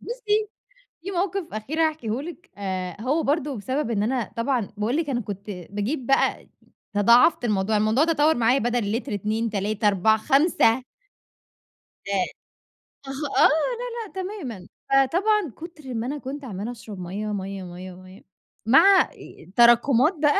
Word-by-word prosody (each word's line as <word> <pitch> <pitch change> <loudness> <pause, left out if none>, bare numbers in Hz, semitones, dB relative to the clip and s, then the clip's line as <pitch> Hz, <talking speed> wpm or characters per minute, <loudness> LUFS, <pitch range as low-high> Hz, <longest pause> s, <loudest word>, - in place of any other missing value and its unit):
بُصّي، 435 -3 -1 0.5
في 390 - -6
مَوقِف 375 - -2
أخير 265 +10 -4
هاحكيه 280 -7 -1
لِك 345 +2 -10
آآ 185 -1 -4
هو 290 +6 0
برضه 285 -3 -1
بسبب 260 +4 -2
إن 210 -2 0
أنا 245 0 -1
طبعًا 235 -3 0
باقول 220 +6 -1
لِك 320 -3 -1
أنا 240 -2 -1
كنت 205 0 -7
باجيب 205 - -4
بقى 270 - +1 0.5
تضاعَفت 235 +7 +5
الموضوع، 210 0 +1
الموضوع 215 +7 +3
تطوّر 320 -1 +3
معايا 240 +3 +3
بدل 240 -4 -1
لتر 240 - -6
2 215 +3 -1
3 210 +1 -1
4 205 +2 +3
5. 265 -2 +3 1.2
ده 200 - -3 1.0
أها، 270 - -5 0.3
آه، - - +7
لا، 315 +10 +1 0.4
لأ - - -21
تمامًا، 260 - -7 0.2
فطبعًا 345 - +2
كُتر 310 -6 -9
ما 230 +2 -3
أنا 290 - -3
كنت 275 0 -7
عمّالة 210 +1 -5
أشرَب 215 -4 -10
مَيّة، 190 +4 -5
مَيّة، 195 -1 -5
مَيّة، 180 +1 -9
مَيّة 185 +1 -14 0.4
مع 355 - +7
إ - - -8
إ 180 - -17
تراكمات 240 +6 +5
بقى. 295 +5 +4
240 Hz, 155 wpm, -24 LUFS, 205-300 Hz, 1.2 s, آه